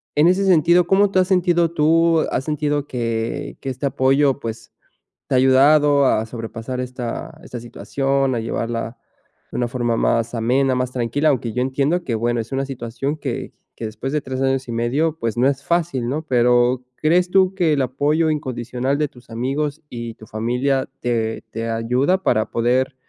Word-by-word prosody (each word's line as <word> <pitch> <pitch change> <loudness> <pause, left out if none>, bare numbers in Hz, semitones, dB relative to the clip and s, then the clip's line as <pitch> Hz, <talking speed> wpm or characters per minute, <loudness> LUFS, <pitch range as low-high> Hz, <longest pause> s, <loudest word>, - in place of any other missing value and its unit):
en 150 +3 +5
ese 185 +2 +3
sentido, 175 -1 +4
¿cómo 195 +2 +4
te 190 - +3
has 185 - +2
sentido 175 -3 +2
tú? 165 +1 +3
¿Has 130 - -1
sentido 150 -1 -1
que 115 -3 -3
que 135 - -4
este 130 +2 -4
apoyo, 135 +1 +2
pues, 115 -2 -7 0.6
te - - 0
ha - - +5
ayudado 140 +2 +5
a 110 - +2
sobrepasar 115 +2 -6
esta 125 +4 -5
esta 125 -9 -7
situación?, 135 +3 -1
a 115 - -1
llevarla 115 +1 -3 0.5
de - - -4
una 120 -1 0
forma 120 -1 -1
más 115 +1 +1
amena, 130 +4 +2
más 125 0 -1
tranquila. 125 +5 0
Aunque 120 -5 -1
yo 125 - -1
entiendo, 140 +7 0
que 120 - -2
bueno, 120 +1 0
es 115 +2 -7
una 135 0 -1
situación, 135 +2 -4
que 135 -5 -4 0.2
que 115 - -4
después 110 +5 -5
de 150 - +1
3 130 0 -4
años 135 -1 0
y - - -4
medio, 140 +8 0
pues, 115 -4 -2
no 130 +3 +4
es 135 -1 -2
fácil, 170 -8 0
¿no? 145 +5 -2
Pero, 125 -1 +3
¿crees 175 +4 +2
tú 190 0 +3
que 175 -5 +2
el 140 - +1
apoyo 145 +5 +1
incondicional 130 -2 -2
de 150 -1 0
tus 125 -3 -19
amigos 140 +6 -2
y 120 -1 -6
tu 110 - -14
familia 125 +5 -1
te 115 -2 -1
te 115 +1 -4
ayuda 125 +11 +1
para 110 -9 +1
poder, 125 +3 +1
130 Hz, 185 wpm, -21 LUFS, 120-150 Hz, 0.6 s, en